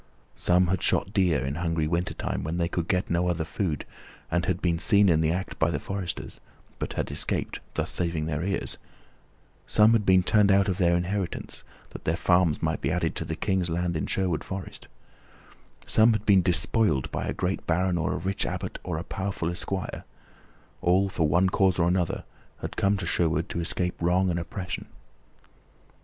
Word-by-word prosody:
Some 90 Hz, +1 st, +3 dB
had 95 Hz, +1 st, 0 dB
shot 95 Hz, -, +1 dB
deer 85 Hz, -10 st, +2 dB
in 70 Hz, -, -2 dB
hungry 85 Hz, -3 st, 0 dB
wintertime, 85 Hz, +2 st, -2 dB
when 80 Hz, +4 st, -3 dB
they 85 Hz, -1 st, +1 dB
could 85 Hz, 0 st, -3 dB
get 90 Hz, -1 st, +1 dB
no 85 Hz, +1 st, +1 dB
other 85 Hz, -2 st, -1 dB
food, 80 Hz, -4 st, -2 dB, 0.5 s
and 90 Hz, 0 st, +1 dB
had 90 Hz, -2 st, 0 dB
been 85 Hz, -3 st, 0 dB
seen 100 Hz, +4 st, +4 dB
in 80 Hz, -2 st, +3 dB
the 80 Hz, -, +2 dB
act 95 Hz, +2 st, -4 dB
by 80 Hz, -, +3 dB
the 75 Hz, -4 st, -1 dB
foresters, 90 Hz, -1 st, -5 dB, 0.4 s
but -, -, -3 dB
had -, -, -3 dB
escaped, -, -, -1 dB, 0.2 s
thus -, -, -1 dB
saving 85 Hz, -3 st, -1 dB
their 75 Hz, 0 st, -2 dB
ears; 100 Hz, +1 st, -2 dB, 0.9 s
some 105 Hz, +1 st, +5 dB
had 110 Hz, -2 st, +3 dB
been 95 Hz, -2 st, +4 dB
turned 105 Hz, +1 st, +4 dB
out 100 Hz, 0 st, +4 dB
of 95 Hz, -2 st, -1 dB
their 85 Hz, -2 st, +4 dB
inheritance, 90 Hz, 0 st, -3 dB, 0.3 s
that -, -, -10 dB
their 80 Hz, -, +1 dB
farms 90 Hz, -4 st, +2 dB
might 80 Hz, 0 st, -1 dB
be -, -, 0 dB
added -, -, -1 dB
to -, -, -3 dB
the -, -, -3 dB
King's 95 Hz, -2 st, 0 dB
lands 85 Hz, +1 st, -1 dB
in 80 Hz, -, -2 dB
Sherwood 90 Hz, -5 st, -1 dB
Forest; 95 Hz, -1 st, -7 dB, 1.0 s
some 110 Hz, +1 st, +5 dB
had 110 Hz, -1 st, -2 dB
been 100 Hz, -2 st, +6 dB
despoiled 85 Hz, -, +2 dB
by -, -, -3 dB
a -, -, -1 dB
great 90 Hz, +2 st, -2 dB
baron 90 Hz, +1 st, +1 dB
or 80 Hz, -, 0 dB
a -, -, -2 dB
rich 95 Hz, +3 st, -1 dB
abbot -, -, -4 dB
or -, -, -3 dB
a 85 Hz, -, -4 dB
powerful 95 Hz, -3 st, -3 dB
esquire 95 Hz, +1 st, -4 dB, 0.8 s
all, 95 Hz, +3 st, +3 dB
for 80 Hz, -4 st, 0 dB
one 85 Hz, +5 st, +3 dB
cause 95 Hz, 0 st, +2 dB
or 85 Hz, -1 st, +2 dB
another, 90 Hz, -1 st, 0 dB, 0.4 s
had -, -, -5 dB
come 100 Hz, +1 st, +2 dB
to 95 Hz, -, -4 dB
Sherwood 85 Hz, -1 st, +1 dB
to -, -, -3 dB
escape 90 Hz, +1 st, -1 dB
wrong 90 Hz, +2 st, +2 dB
and 85 Hz, -, -1 dB
oppression. 90 Hz, +1 st, -5 dB
90 Hz, 190 wpm, -26 LUFS, 85-95 Hz, 1.0 s, been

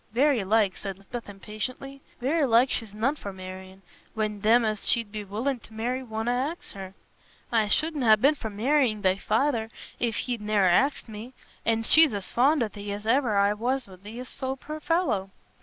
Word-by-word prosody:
"Very 265 Hz, -2 st, +3 dB
like," 205 Hz, -1 st, +2 dB
said 195 Hz, -2 st, -6 dB
Lisbeth, 215 Hz, +4 st, -8 dB
impatiently, 215 Hz, +7 st, -7 dB, 0.2 s
"very 290 Hz, +6 st, +1 dB
like 240 Hz, +2 st, +4 dB
she's 215 Hz, -3 st, -3 dB
none 250 Hz, +7 st, +1 dB
for 200 Hz, -9 st, -7 dB
marr'ing, 190 Hz, 0 st, -10 dB, 0.3 s
when 215 Hz, -2 st, -2 dB
them 230 Hz, +3 st, +4 dB
as 215 Hz, -1 st, -2 dB
she'd 230 Hz, -3 st, +2 dB
be 210 Hz, 0 st, -5 dB
willin' 235 Hz, +7 st, -2 dB
t' 220 Hz, -, -15 dB
marry 245 Hz, +4 st, -2 dB
wonna 225 Hz, -1 st, -3 dB
ax 275 Hz, +8 st, -3 dB
her. 195 Hz, -1 st, -9 dB, 0.6 s
I 225 Hz, -3 st, +3 dB
shouldna 290 Hz, -1 st, +2 dB
ha' 215 Hz, -, +6 dB
been 280 Hz, +6 st, +5 dB
for 235 Hz, -7 st, -6 dB
marr'ing 225 Hz, 0 st, +1 dB
thy 185 Hz, 0 st, +3 dB
feyther 225 Hz, +2 st, 0 dB, 0.3 s
if 235 Hz, -3 st, 0 dB
he'd 240 Hz, -3 st, -2 dB
ne'er 210 Hz, -2 st, +2 dB
axed 265 Hz, +13 st, +2 dB
me; 225 Hz, +4 st, -9 dB, 0.3 s
an' 225 Hz, 0 st, +2 dB
she's 310 Hz, -1 st, +6 dB
as 200 Hz, -2 st, -5 dB
fond 270 Hz, +3 st, +3 dB
o' -, -, 0 dB
thee 205 Hz, -1 st, -7 dB
as 205 Hz, +1 st, -6 dB
e'er 230 Hz, -2 st, +2 dB
I 200 Hz, +1 st, +4 dB
war 235 Hz, +5 st, 0 dB
o' -, -, +1 dB, 0.2 s
Thias, 220 Hz, +7 st, -9 dB, 0.2 s
poor 305 Hz, +3 st, -7 dB
fellow." 295 Hz, -, 0 dB
225 Hz, 190 wpm, -26 LUFS, 205-255 Hz, 0.6 s, ha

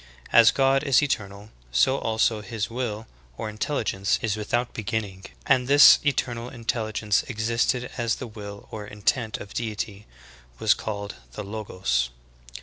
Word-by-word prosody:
As 115 Hz, -2 st, +8 dB
God 135 Hz, 0 st, +3 dB
is 140 Hz, -1 st, +4 dB
eternal, 100 Hz, -5 st, -3 dB, 0.2 s
so 95 Hz, -, +3 dB
also 110 Hz, -1 st, +1 dB
His 110 Hz, 0 st, -4 dB
will 115 Hz, -3 st, -3 dB, 0.3 s
or 110 Hz, -, -4 dB
intel 115 Hz, +6 st, -2 dB
ligence 100 Hz, -1 st, 0 dB
is 110 Hz, -2 st, 0 dB
without 120 Hz, +3 st, -2 dB
beginning, 100 Hz, -3 st, -4 dB, 0.2 s
and 125 Hz, -1 st, +3 dB
this 145 Hz, +1 st, +8 dB
eternal 120 Hz, -4 st, -1 dB
intelligence 110 Hz, -3 st, -1 dB
existing 120 Hz, +2 st, 0 dB
as 115 Hz, -1 st, +1 dB
the -, -, -7 dB
will 105 Hz, -3 st, -9 dB
or 105 Hz, -2 st, -6 dB
intent 110 Hz, +2 st, -1 dB
of 100 Hz, -, -10 dB
Deity, 105 Hz, -2 st, -4 dB, 0.5 s
was -, -, +4 dB
called 100 Hz, -1 st, -5 dB, 0.2 s
the 105 Hz, -, -5 dB
Logos. 90 Hz, -, -2 dB
110 Hz, 145 wpm, -25 LUFS, 105-120 Hz, 0.5 s, As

